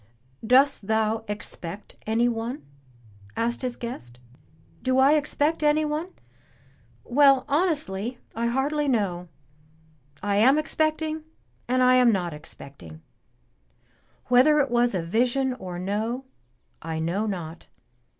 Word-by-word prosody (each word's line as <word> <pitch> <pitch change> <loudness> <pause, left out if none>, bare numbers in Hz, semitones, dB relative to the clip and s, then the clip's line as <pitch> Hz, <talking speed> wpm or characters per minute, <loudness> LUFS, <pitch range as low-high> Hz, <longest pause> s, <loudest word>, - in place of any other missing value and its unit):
"Dost 255 -2 +3
thou 220 0 +1
expect 205 -2 -6
anyone?" 230 - -1 0.7
asked 235 +1 -1
his 250 -2 -3
guest. 120 - -8 0.6
"Do 260 0 +1
I 265 +2 +6
expect 300 +1 0
anyone? 305 +2 +1 1.0
Well, 275 0 +4
honestly, 280 - -1 0.2
I 230 +1 -1
hardly 285 +4 0
know. 195 -8 -1 1.0
I 200 -1 0
am 260 +7 +5
expecting 310 0 -1 0.4
and 255 +1 +2
I 255 0 +5
am 250 -2 +5
not 180 -5 -1
expecting. 135 - -12 1.2
Whether 255 +5 +5
it 280 -4 +1
was 240 -2 +2
a 175 - -1
vision 250 +8 +1
or 185 -7 -7
no, 215 +8 -3 0.6
I 160 0 -4
know 175 +7 -1
not. 170 -5 -6
240 Hz, 110 wpm, -25 LUFS, 200-275 Hz, 1.2 s, I